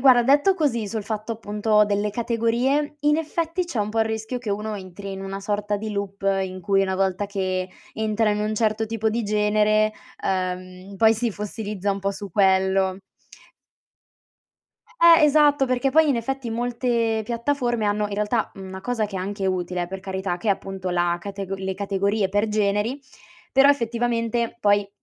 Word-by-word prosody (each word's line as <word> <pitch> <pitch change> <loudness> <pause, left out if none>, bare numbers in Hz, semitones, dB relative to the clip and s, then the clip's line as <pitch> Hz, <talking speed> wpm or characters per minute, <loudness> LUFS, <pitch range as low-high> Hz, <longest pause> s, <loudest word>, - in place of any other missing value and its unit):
guarda, 250 -2 +6
detto 290 +9 +4
così 260 - 0
sul 220 +1 -3
fatto 215 +2 -4
appunto 210 -1 +2
delle 205 0 0
categorie, 240 +6 0
in 295 +1 +3
effetti 330 +2 -2
c'è 340 -10 -5
un 205 - 0
po' 225 +1 0
il 220 - +4
rischio 220 +2 -3
che 235 -4 -5
uno 210 +1 -2
entri 195 +1 -8
in 195 0 -6
una 195 0 -5
sorta 205 +1 -1
di 215 +1 -5
loop 200 -1 -4 0.2
in 185 0 -5
cui 195 +2 +2
una 190 -1 -1
volta 190 +1 0
che 185 -2 -2 0.3
entra 220 0 +1
in 210 - 0
un 215 +1 -1
certo 220 0 +1
tipo 220 0 -1
di 230 +2 -1
genere, 215 +1 +2 0.3
uhm, 185 +1 -3
poi 220 +2 +5
si 230 +1 -1
fossilizza 205 -1 -4
un 195 - -1
po' 195 +1 0
su 200 -1 -8
quello. 190 0 +2 2.0
Eh 335 -2 +8
esatto, 290 -2 +4
perché 255 +1 +1
poi 315 +2 +5
in 270 - +2
effetti, 255 +1 -3
molte 235 -1 0
piattaforme 240 -1 -1
hanno 210 0 +1
in 205 - -4
realtà, 210 +2 0
mhmm, 190 -1 -9
una 190 0 -7
cosa 230 0 -1
che 195 -2 -7
è - - -2
anche 195 +1 -3
utile, 180 -1 -1
eh 175 - -3
per 190 +1 -6
carità, 190 -1 -3
che 210 +4 -4
è - - +6
appunto 190 -1 -3
la 175 -1 +1
catego 195 0 -5
le 190 0 -3
categorie 200 +1 0
per 205 +2 +1
generi, 210 +5 0 0.5
però 270 +1 +5
effettivamente 235 -2 0
poi, 205 -1 +3
210 Hz, 180 wpm, -23 LUFS, 195-235 Hz, 2.0 s, Eh